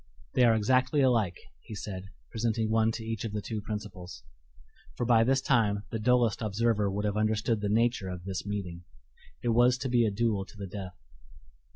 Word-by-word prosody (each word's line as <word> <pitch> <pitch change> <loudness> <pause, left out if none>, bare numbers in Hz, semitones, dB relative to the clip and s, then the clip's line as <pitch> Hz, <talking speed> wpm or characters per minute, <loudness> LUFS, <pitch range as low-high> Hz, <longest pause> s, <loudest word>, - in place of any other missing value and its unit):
"They 125 - +5
are 115 -1 +5
exactly 130 +6 +2
alike," 115 -9 +2 0.2
he 110 - -10
said, 95 -2 -6 0.3
presenting 110 -1 -1
one 110 0 +3
to 110 - -6
each 115 -2 -3
of 110 -2 -4
the 105 - -1
two 105 +1 -4
principals 100 - -7 0.7
for - - -2
by 115 -1 +5
this 135 +3 +2
time 105 -6 +2
the 115 - -2
dullest 120 -1 +2
observer 105 -1 +1
would 100 +2 -2
have 105 0 -1
understood 110 +1 +1
the 105 - -1
nature 115 -3 +1
of 90 -1 -6
this 95 0 -4
meeting. 95 -4 -5 0.6
It 120 - 0
was 120 +2 +4
to 130 0 -3
be 120 -2 +3
a - - +2
duel 105 -1 0
to 100 - -15
the 100 - -5
death. 95 -2 -7
110 Hz, 195 wpm, -29 LUFS, 100-120 Hz, 0.7 s, They